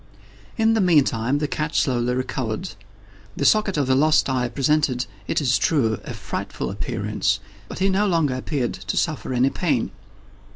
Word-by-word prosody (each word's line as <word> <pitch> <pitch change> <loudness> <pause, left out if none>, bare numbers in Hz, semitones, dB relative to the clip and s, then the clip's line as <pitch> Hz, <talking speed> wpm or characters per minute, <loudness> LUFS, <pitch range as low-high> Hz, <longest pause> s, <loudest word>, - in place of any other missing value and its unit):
In 225 0 +3
the 220 - +2
meantime 140 -7 +3
the 150 0 -1
cat 150 +1 -3
slowly 125 -3 +1
recovered. 130 - -3 0.7
The 140 - -1
socket 215 -2 +3
of 145 - +2
the 130 - +2
lost 155 +3 +4
eye 125 -2 0
presented, 135 -1 +1 0.2
it - - +1
is 125 -6 +2
true, 115 - +1
a - - -7
frightful - - -4
appearance, 100 +2 -1 0.3
but - - -8
he 190 - +2
no 195 +2 +2
longer 165 -7 +2
appeared 130 0 -2
to 95 0 -5
suffer 155 -5 -1
any 130 +2 +2
pain. 145 -10 0
135 Hz, 165 wpm, -23 LUFS, 120-155 Hz, 0.7 s, lost